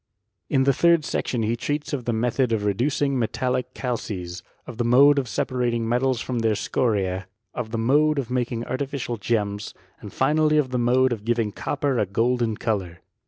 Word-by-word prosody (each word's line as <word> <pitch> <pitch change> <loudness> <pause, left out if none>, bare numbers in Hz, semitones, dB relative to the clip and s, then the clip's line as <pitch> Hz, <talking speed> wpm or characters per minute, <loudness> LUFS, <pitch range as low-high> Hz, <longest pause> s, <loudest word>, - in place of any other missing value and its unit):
In 135 -2 +3
the 140 +1 +3
third 170 +1 +3
section 120 -3 -1
he 110 +2 0
treats 145 +5 -3
of 130 -4 -3
the 120 - 0
method 120 +2 0
of 110 -2 0
rCt 100 -1 +1
ducing 140 +1 +1
metallic 125 +2 -1
calces, 95 -8 -4 0.2
of 120 - -9
the 120 - 0
mode 140 +5 +6
of 130 - -3
separating 120 -2 -1
m»* 120 +2 +1
tals 130 -3 +1
from 125 -2 -2
their 110 -1 +1
scoriee, 95 -5 -1 0.3
of 120 -3 -4
the 115 - -3
mode 145 +6 +3
of 130 -3 -3
making 120 -2 -1
artificial 130 -2 -3
gems, 105 -1 -2 0.2
and - - -9
finally 155 +3 +2
of 135 -4 +1
the 125 - 0
mode 125 +1 +3
of 105 -3 -7
giving 115 -2 0
copper 140 0 -1
% 100 - -22
golden 115 -1 +1
colour. 95 -6 -3
120 Hz, 190 wpm, -24 LUFS, 110-130 Hz, 0.3 s, mode